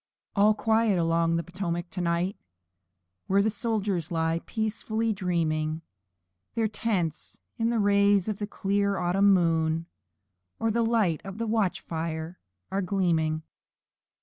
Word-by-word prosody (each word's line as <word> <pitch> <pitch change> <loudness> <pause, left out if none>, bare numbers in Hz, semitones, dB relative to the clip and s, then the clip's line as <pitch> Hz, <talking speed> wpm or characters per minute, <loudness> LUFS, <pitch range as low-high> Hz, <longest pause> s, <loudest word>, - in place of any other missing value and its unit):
All 210 +1 +5
quiet 220 -2 +2
along 165 0 +2
the 170 - 0
Potomac 175 0 -4
to 180 - -3
night! 175 +3 0 0.9
Where 200 +2 +3
soldiers 205 -6 -1
lie 165 0 0
peacefully 220 0 -1
dreaming; 165 -5 0
And 160 - -7 0.7
their 225 -1 +2
tents 200 -7 -2 0.2
in 225 0 +2
the 235 - +1
rays 200 -1 +3
of 210 -2 -2
the 205 - -3
clear 200 0 0
autumn 190 +3 +3
moon, 165 -3 +2 0.7
And 225 -1 +1
the 235 - +2
light 225 -8 +2
of 195 0 -7
their 230 0 -2
camp 215 -4 +1
fires 160 +1 -4 0.4
are 195 +1 0
gleaming. 165 -5 0
190 Hz, 135 wpm, -27 LUFS, 165-215 Hz, 0.9 s, All